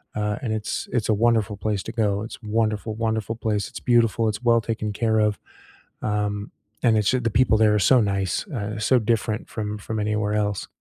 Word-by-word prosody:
uh, 105 Hz, 0 st, -1 dB
and 110 Hz, -3 st, -1 dB
it's 110 Hz, -1 st, -3 dB
it's 115 Hz, -3 st, 0 dB
a -, -, +5 dB
wonderful 110 Hz, -2 st, +2 dB
place 105 Hz, -1 st, -1 dB
to -, -, -6 dB
go, 105 Hz, -3 st, 0 dB
it's 110 Hz, -, -7 dB
a 115 Hz, -, -13 dB
wonderful, 110 Hz, -1 st, 0 dB
wonderful 110 Hz, 0 st, -1 dB
place, 110 Hz, -2 st, -1 dB
it's 130 Hz, -, -8 dB
beautiful, 115 Hz, -2 st, +2 dB
it's 105 Hz, +3 st, -5 dB
well 115 Hz, -1 st, +4 dB
taken 110 Hz, -1 st, -3 dB
care 110 Hz, +1 st, +1 dB
of, 105 Hz, -3 st, +1 dB, 0.6 s
um, 105 Hz, -1 st, -2 dB, 0.3 s
and 115 Hz, -3 st, +4 dB
it's 105 Hz, -2 st, +2 dB
ju 130 Hz, -, +1 dB
the 115 Hz, -2 st, 0 dB
people 110 Hz, 0 st, +3 dB
there 110 Hz, -1 st, +4 dB
are -, -, +2 dB
so 125 Hz, +7 st, +5 dB
nice, 100 Hz, -, -1 dB
uh, 105 Hz, -7 st, -4 dB
so 125 Hz, +4 st, +3 dB
different 110 Hz, 0 st, -1 dB
from 105 Hz, -1 st, -4 dB
from 110 Hz, +1 st, -4 dB
anywhere 105 Hz, 0 st, 0 dB
else. 105 Hz, -2 st, -1 dB
110 Hz, 210 wpm, -24 LUFS, 105-115 Hz, 0.6 s, a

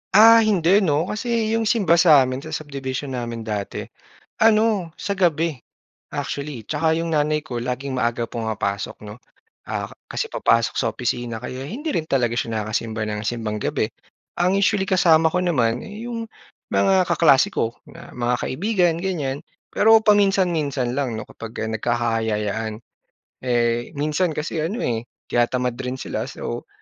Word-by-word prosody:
Ah, 225 Hz, +2 st, +9 dB
hindi 200 Hz, -3 st, +4 dB
'no, 155 Hz, -5 st, +2 dB
kasi 225 Hz, 0 st, -1 dB
yung 225 Hz, -1 st, +1 dB
simba 185 Hz, -7 st, +3 dB
sa'min 135 Hz, -6 st, +5 dB
sa 155 Hz, +2 st, -6 dB
subdivision 140 Hz, -2 st, -5 dB
namin 120 Hz, -2 st, -4 dB
dati 105 Hz, -2 st, -4 dB, 0.6 s
ano, 215 Hz, -5 st, +3 dB
sa 200 Hz, -, -2 dB
gabi, 165 Hz, -4 st, +1 dB, 0.6 s
actually. 140 Hz, -4 st, -4 dB
'Tsaka 160 Hz, +1 st, +1 dB
yung 165 Hz, 0 st, -2 dB
nanay 150 Hz, +1 st, +1 dB
ko 130 Hz, -5 st, -6 dB
laging 130 Hz, +2 st, -3 dB
maaga 120 Hz, -1 st, 0 dB
pumapasok, 110 Hz, -3 st, -3 dB
'no, 105 Hz, -, -9 dB, 0.5 s
ah, -, -, -4 dB
ka -, -, -14 dB, 0.2 s
kasi -, -, -2 dB
papasok 115 Hz, 0 st, +2 dB
sa -, -, +1 dB
opisina 120 Hz, -1 st, -3 dB
kaya 130 Hz, +1 st, -6 dB
hindi 270 Hz, -, -5 dB
rin 165 Hz, -, -1 dB
talaga 120 Hz, -5 st, 0 dB
siya 110 Hz, -3 st, -1 dB
nakakasimba 110 Hz, 0 st, -2 dB
ng 105 Hz, 0 st, -3 dB
Simbang 110 Hz, -1 st, -2 dB
Gabi. -, -, -1 dB, 0.5 s
Ang 180 Hz, +2 st, +2 dB
usually 195 Hz, -1 st, +2 dB
kasama 165 Hz, -4 st, +4 dB
ko 180 Hz, -, +1 dB
naman, 125 Hz, -9 st, +1 dB
eh, 210 Hz, +3 st, -8 dB
yung 230 Hz, -2 st, -5 dB, 0.4 s
mga 190 Hz, -2 st, +3 dB
kaklase 140 Hz, -5 st, +5 dB
ko 115 Hz, +1 st, -1 dB, 0.2 s
na -, -, -13 dB
mga 120 Hz, 0 st, 0 dB
kaibigan, 180 Hz, +1 st, +1 dB
ganyan. 150 Hz, -7 st, -2 dB, 0.3 s
Pero 225 Hz, +1 st, +6 dB
paminsan-minsan 175 Hz, -, +2 dB
lang 130 Hz, -5 st, -2 dB
'no, 110 Hz, -, -6 dB
kapag 115 Hz, -1 st, -10 dB
ah, -, -, -3 dB
nagkakayayaan. 110 Hz, -2 st, -1 dB, 0.6 s
Eh, 120 Hz, -1 st, 0 dB
minsan 155 Hz, +3 st, 0 dB
kasi 155 Hz, +1 st, -2 dB
ano, 195 Hz, +10 st, -2 dB
eh, 115 Hz, -2 st, 0 dB, 0.3 s
tinatamad 125 Hz, 0 st, +1 dB
rin 125 Hz, 0 st, -3 dB
sila -, -, -4 dB
so, -, -, -6 dB
140 Hz, 150 wpm, -22 LUFS, 120-180 Hz, 0.6 s, Ah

